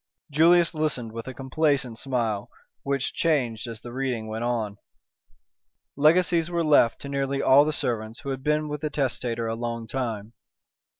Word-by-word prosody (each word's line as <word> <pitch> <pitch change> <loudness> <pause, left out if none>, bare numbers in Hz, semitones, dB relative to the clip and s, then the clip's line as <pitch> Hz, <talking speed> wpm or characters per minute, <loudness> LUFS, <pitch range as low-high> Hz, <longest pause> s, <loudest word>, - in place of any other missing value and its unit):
Julius 170 +4 +5
listened 150 -7 -2
with 115 +2 -7
a 130 - -5
complacent 135 -3 0
smile, 115 -6 -2 0.3
which 140 -1 -1
changed 125 -8 0
as 115 -2 -7
the 120 0 -9
reading 130 -4 -2
went 110 +1 -4
on. 110 -4 -2 1.2
Legacies 165 +3 +3
were 170 -1 0
left 145 -6 +4
to - - -7
nearly 140 0 -1
all 140 +2 +6
the 155 - 0
servants 115 -4 -2
who 140 - -6
had 135 -1 -3
been 150 +1 0
with 150 -1 -5
the 155 - -1
testator 125 -5 -2
a 115 - -1
long 115 0 -4
time. 115 -3 -4
130 Hz, 165 wpm, -25 LUFS, 115-150 Hz, 1.2 s, all